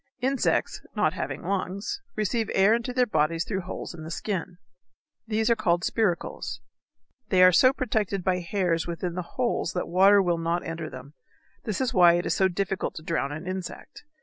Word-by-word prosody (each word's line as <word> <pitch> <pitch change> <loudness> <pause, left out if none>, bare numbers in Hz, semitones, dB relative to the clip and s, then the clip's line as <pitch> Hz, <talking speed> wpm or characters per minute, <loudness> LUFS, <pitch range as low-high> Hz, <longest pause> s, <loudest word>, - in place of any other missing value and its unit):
Insects, 265 +1 0
not - - +2
having - - -4
lungs, 200 - -3
receive 215 +1 -1
air 195 +3 +5
into 235 +2 -1
their 250 0 +2
bodies 165 -4 +1
through 195 -3 -2
holes 180 0 -6
in 165 -2 -9
the 160 - -7
skin. 180 0 -4 0.7
These 220 +1 +1
are - - +5
called 175 -4 +1
spiracles. 205 -7 -1 0.7
They 185 -2 +5
are 185 - +8
so 255 +8 +6
protected 215 -7 -1
by 185 -1 +1
hairs 175 -2 -1
within 170 +1 -3
the 180 - -3 0.2
holes 240 -8 0
that 180 - -2
water 195 +4 +6
will 175 -3 +1
not 170 +1 -1
enter 165 -1 -5
them. 130 +3 -11 0.5
This 215 -4 -2
is 260 -3 0
why 175 -2 +7
it 175 +1 0
is - - +1
so 190 - +3
difficult 195 +1 -2
to 155 - -8
drown 160 -4 -1
an 155 +4 -6
insect. 185 -1 -7
185 Hz, 185 wpm, -26 LUFS, 170-215 Hz, 0.7 s, are